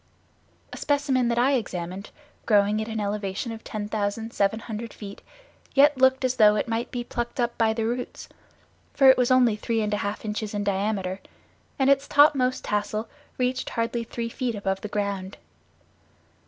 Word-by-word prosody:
A - - -6
specimen 280 -4 +1
that 235 0 0
I 250 +3 +4
examined, 190 -6 -3 0.4
growing 210 0 +3
at 220 - -4
an 220 -1 -3
elevation 205 +2 -3
of 225 0 -8
10,700 215 +1 -2
feet, 200 -2 -9 0.5
yet 290 +1 +6
looked 260 0 +3
as 255 0 0
though 210 -2 +6
it 215 - -1
might 230 +1 -2
be 245 -1 -4
plucked 240 +1 -5
up 240 -1 0
by 225 -1 +2
the 220 0 -2
roots, 245 +2 -4 0.7
for 270 -1 +8
it - - +3
was 245 - +3
only 250 -4 +4
three 225 +1 -2
and 210 -1 -1
a - - +1
half 205 +2 -4
inches 210 0 -3
in 205 - -1
diameter 195 -1 -1 0.6
and 265 - +2
its 275 0 +3
topmost 275 -3 +4
tassel 215 +1 -2 0.3
reached 255 0 -1
hardly 230 0 -2
three 230 0 -5
feet 240 -1 -3
above 195 -1 -2
the - - -4
ground. 200 -2 -3
225 Hz, 170 wpm, -25 LUFS, 205-250 Hz, 0.7 s, for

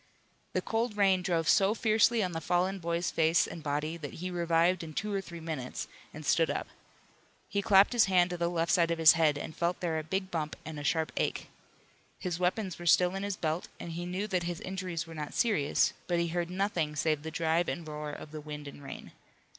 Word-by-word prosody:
The - - 0
cold 225 -1 -1
rain 190 -2 +4
drove 170 -3 0
so 200 +4 +4
fiercely 225 0 +3
on 180 - -1
the 165 -1 -4
fallen 180 +4 +1
boy's 170 0 -1
face 160 +1 +3
and 165 - -8
body 150 +2 -2
that 145 -4 -7
he 180 +2 -5
revived 170 0 +2
in 155 -2 -8
two 210 0 -2
or 195 - 0
three 170 -3 -9
minutes, 155 -6 -5 0.2
and 155 0 -9
stood 165 +2 +3
up. - - -2 0.8
He 200 - -1
clapped 200 +2 +5
his 240 - +5
hand 180 -2 +3
to 175 - -3
the 170 0 0
left 170 -1 0
side 170 -2 +4
of 170 - 0
his 160 -1 +8
head, 160 -3 +3
and 155 - -6
felt 175 +1 0
there 165 -3 -1
a - - -5
big 190 +4 -3
bump 155 -3 -2
and 155 -1 -6
a - - -6
sharp 160 +2 +1
ache. - - -1 0.7
His 180 -2 -3
weapons 185 0 -1
were 175 - -5
still 180 +2 +5
in 195 - -3
his 200 -1 -2
belt 160 +2 -2
and 170 - -6
he 175 +2 -4
knew 185 +3 -2
that 185 -4 0
his 175 -1 -3
injuries 185 -3 -4
were 165 - -10
not 150 -2 -6
serious, 205 - +2
but 175 - +1
he 170 0 0
heard 175 0 -2
nothing 180 -5 -1
save 155 0 +1
the 160 - -5
drive 165 +1 +1
and 165 -2 -4
roar 150 0 -5
of 145 0 -9
the 155 -1 -6
wind 150 -1 -7
and 140 - -10
rain. 140 - -9
170 Hz, 230 wpm, -30 LUFS, 160-185 Hz, 0.8 s, his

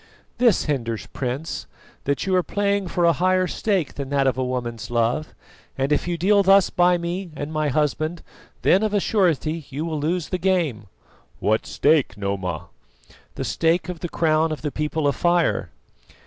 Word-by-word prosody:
"This 240 -6 +4
hinders, 115 -7 -2
Prince, 135 +5 -4 0.4
that 140 0 0
you 190 -1 +1
are 180 - +4
playing 200 +1 0
for 175 0 +1
a 170 - +5
higher 185 +3 +2
stake 190 -3 -1
than 140 -2 -5
that 140 -1 +1
of 130 - +2
a 130 - -1
woman's 120 -3 -4
love, 120 +6 0 0.4
and 135 +2 0
if 150 - +1
you 175 -1 -1
deal 200 +4 +4
thus 195 0 +5
by 175 0 +4
me 175 +2 -4
and 145 +2 -5
my 155 -1 0
husband, 155 +3 -1 0.4
then 190 - +5
of 215 -1 0
a - - +4
surety 165 -7 0
you 145 +3 -4
will 160 -2 -2
lose 165 +2 -1
the 185 - -2
game." 170 - 0 0.5
"What 110 +1 +1
stake, 145 -8 +2
Noma?" 100 -5 -3 0.7
"The - - -3
stake 165 +1 +1
of 180 -2 -5
the 175 - -4
crown 160 0 +2
of 155 - -5
the 150 - -2
People 150 +1 -1
of 140 - +1
Fire." 175 -1 +1
160 Hz, 180 wpm, -23 LUFS, 140-180 Hz, 0.7 s, a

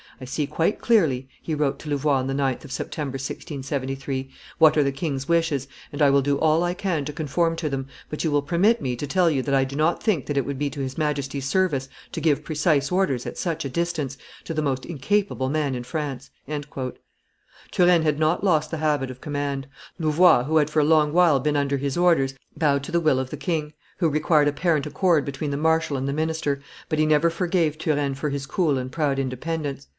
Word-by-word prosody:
"I 130 - -8
see 145 +4 -2
quite 160 +7 0
clearly," 155 - +2
he 160 - -3
wrote 145 -2 0
to 155 - -8
Louvois 145 -1 +2
on 130 0 -2
the 135 - -1
9th 135 -2 -1
of - - -10
September, 140 -2 -4
1673, 135 -1 -4 0.3
"what 160 -2 +7
are 150 - +5
the 140 - +1
king's 135 -1 -3
wishes, 165 -5 +1 0.2
and 145 - -7
I 145 -2 +5
will 140 0 +4
do 140 0 +1
all 160 +1 +3
I 175 0 -1
can 175 -7 -1
to 150 - -5
conform 165 +2 0
to 160 -2 -2
them 135 -1 -3 0.2
but 150 - -4
you 160 - +1
will 145 -1 +1
permit 190 +10 +2
me 125 -2 -1
to 145 - -4
tell 180 +2 +3
you 135 -3 +1
that 140 +1 +1
I 135 - +4
do 135 +1 -5
not 155 +4 +1
think 200 - +1
that 145 - -2
it 135 - +1
would 140 -1 -4
be 145 -1 0
to 145 - -7
his 135 -1 -4
Majesty's 140 -3 -2
service 145 -5 +1 0.2
to - - -4
give 150 -4 +2
precise 150 -3 +1
orders, 180 -10 +1
at - - -6
such 165 -3 -2
a - - -2
distance, 155 -2 -2 0.3
to 165 - -5
the 155 - +1
most 135 -3 -1
incapable 170 - -1
man 145 -2 0
in 125 -1 -4
France." 140 -2 -4 1.4
Turenne 175 -2 +4
had 150 -1 +1
not 160 +4 +1
lost 155 -6 +2
the 165 - -3
habit 150 -4 0
of 130 0 -9
command; 145 -2 -3 0.3
Louvois, 160 -3 +5
who 155 +4 +1
had 150 -1 +3
for 155 - +1
a - - +4
long 150 -1 +3
while 170 -5 +5
been 150 +3 0
under 140 0 +1
his 140 +1 -2
orders, 165 -7 +3 0.2
bowed 140 -3 +1
to 155 - -7
the 170 - +2
will 155 -5 +2
of 130 -1 -4
the 150 - -5
king, 150 0 -2 0.2
who 170 -3 +2
required 150 0 +3
apparent 150 0 +1
accord 155 0 +2
between 140 +1 -3
the 140 - -1
marshal 160 -1 +1
and 135 +1 -2
the 140 - -1
minister, 155 -2 -1 0.3
but 155 -2 0
he 155 - +4
never 155 +2 +4
forgave 170 -3 0
Turenne 145 -3 0
for 150 +2 -2
his 140 -1 -3
cool 150 -2 +1
and 130 0 -4
proud 145 -3 0
independence. 140 +2 -3
150 Hz, 225 wpm, -24 LUFS, 135-160 Hz, 1.4 s, what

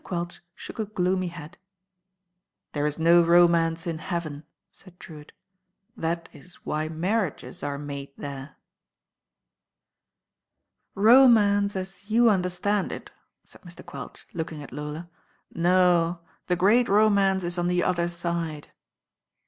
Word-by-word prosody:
Quelch 175 -1 -5
shook - - -10
a 220 - 0
gloomy 185 -2 -1
head. 170 -1 -10 1.1
"There 145 0 -1
is 150 - -3
no 170 +1 +5
romance 170 -1 +3
in 165 -2 -3
heaven," 160 -4 -5 0.3
said 185 -2 -16
I^rewitt. 150 -2 -12 0.7
"That 165 +1 -3
is 180 -1 -12
why 155 +1 -2
marriages 165 - -2
are 145 -1 -3
made 140 -1 -7
there." 140 0 -8 2.4
"Romance 205 -3 +5
as 190 +2 -7
you 230 +1 +5
understand 190 +1 0
it/' - - -8 0.3
said - - -15
Mr. 175 -2 -13
Quelch, 175 - -10
looking 160 -3 -5
at - - -12
Lola. 150 +4 -6 0.5
"No; 175 -1 +2 0.3
the 180 - +2
great 210 +7 +3
romance 200 -2 +3
it 175 +1 -2
on 175 - 0
the 180 0 +1
Other 175 -1 0
Side." 170 -3 -4
175 Hz, 125 wpm, -25 LUFS, 160-190 Hz, 2.4 s, no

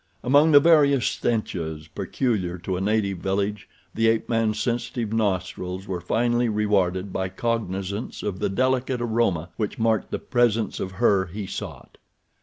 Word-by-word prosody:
Among 145 +5 +5
the 145 - +9
various 145 -5 +4
stenches 85 -9 -2
peculiar 95 - -2
to 90 +1 -3
a 90 - -3
native 100 -2 0
village 100 +2 -2 0.2
the 115 0 +2
ape 115 0 +1
man's 115 -2 0
sensitive 120 -2 -2
nostrils 95 -3 -2
were 90 -2 -3
finally 120 +5 +1
rewarded 100 -3 0
by 95 0 -1
cognizance 100 -1 -3
of 95 -3 -3
the 105 - 0
delicate 130 +4 0
aroma 110 -8 0
which 105 -3 -3
marked 115 -1 +1
the - - -2
presence 120 -3 +1
of 95 - -4
her 100 -3 +2
he 100 +4 -6
sought. 95 - -8
105 Hz, 150 wpm, -24 LUFS, 95-120 Hz, 0.2 s, the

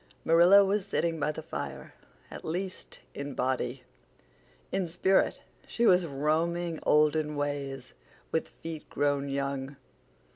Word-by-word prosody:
Marilla 175 +5 +7
was 200 +1 +1
sitting 165 -4 0
by 150 +1 +1
the 155 +1 -8
fire—at 70 - -9
least, 185 +3 -5
in 140 -1 -6
body. 125 0 -1 0.9
In 190 -2 0
spirit 185 +3 +2 0.3
she 235 - 0
was 180 -4 +5
roaming 160 +4 0
olden 150 0 +3
ways, 140 -3 -4 0.4
with 160 - 0
feet 160 -2 -8
grown 145 -1 0
young. 140 0 -3
150 Hz, 115 wpm, -29 LUFS, 140-170 Hz, 0.9 s, Marilla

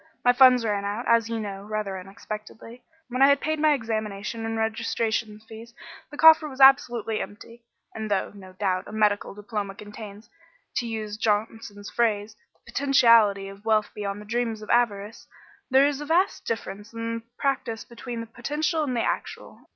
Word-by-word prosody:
My 245 - +6
funds 250 -2 +6
ran 205 -2 -1
out, 205 +4 -3
as 230 -1 +3
you 230 -1 -2
know, 200 -2 -5
rather 210 -2 -3
unexpectedly. 215 +5 -9 0.3
When 255 +2 -2
I 275 - +8
had 280 0 +4
paid 310 +1 -2
my 305 0 +4
examination 225 -2 -3
and 225 0 -3
registration 220 -1 -1
fees 225 +1 -12 0.3
the 290 - -11
coffer 320 -1 +7
was 265 -1 -11
absolutely 245 -5 +4
empty, 230 +3 -10 0.3
and 220 -1 -5
though, 200 -2 0
no 190 -2 -13
doubt, 185 -1 -1
a - - -9
medical 210 -2 +1
diploma 205 -1 -5
contains 210 +1 -10 0.5
to 240 - -1
use 215 -2 -4
Johnson's 210 -1 -2
phrase 215 -3 0 0.2
the - - -17
potentiality 230 -8 +4
of 195 +1 -12
wealth 215 -1 +1
beyond 200 -1 -4
the 210 - -11
dreams 225 -1 -2
of 215 - -4
avarice, 225 -3 0 0.4
there 265 +1 +5
is 290 0 -1
a - - -5
vast 355 +5 +1
difference 210 -1 -5
in 230 0 -3 0.2
practice 265 -5 -2
between 235 0 -7
the - - -6
potential 300 +8 -2
and 255 -4 -2
the 230 - +1
actual. - - -5
225 Hz, 175 wpm, -25 LUFS, 210-245 Hz, 0.5 s, I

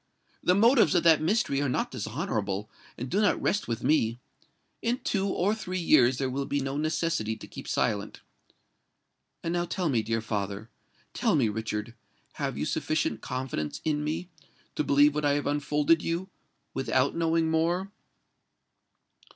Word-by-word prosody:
The 180 - +3
motives 225 - +5
of 170 - +3
that 165 -2 +6
mystery 155 -5 +1
are 140 - 0
not - - -1
dishonourable, 110 - -3 0.3
and 125 - -4
do 195 +11 +1
not 210 - +3
rest 205 - 0
with 115 0 -3
me. 115 -7 +2 0.6
In 235 +2 0
two 200 -6 -1
or 195 +1 +1
three 185 -4 -4
years 130 -8 +4
there 135 - 0
will 140 +1 -2
be 145 - 0
no 135 0 -3
necessity 155 -7 -1
to 110 - -10
keep - - -10
silent. 105 -1 -1 1.2
And 170 - -1
now 175 0 0
tell 180 -1 -1
me, 120 -5 +2
dear 115 +1 -1
father—tell 105 -1 -3
me, 125 -7 +3
Richard—have 110 +1 -5
you - - -1
sufficient 150 -8 -1
confidence 125 - -4
in 150 -1 0
me, 155 +4 -3 0.5
to - - -1
believe 145 +1 +5
what 150 0 -2
I 145 -1 +3
have 145 0 -1
unfolded 150 +2 +2
you, 175 +3 -2 0.4
without 135 0 +1
knowing 165 -1 +1
more?" 175 +4 0
145 Hz, 155 wpm, -28 LUFS, 115-170 Hz, 1.2 s, that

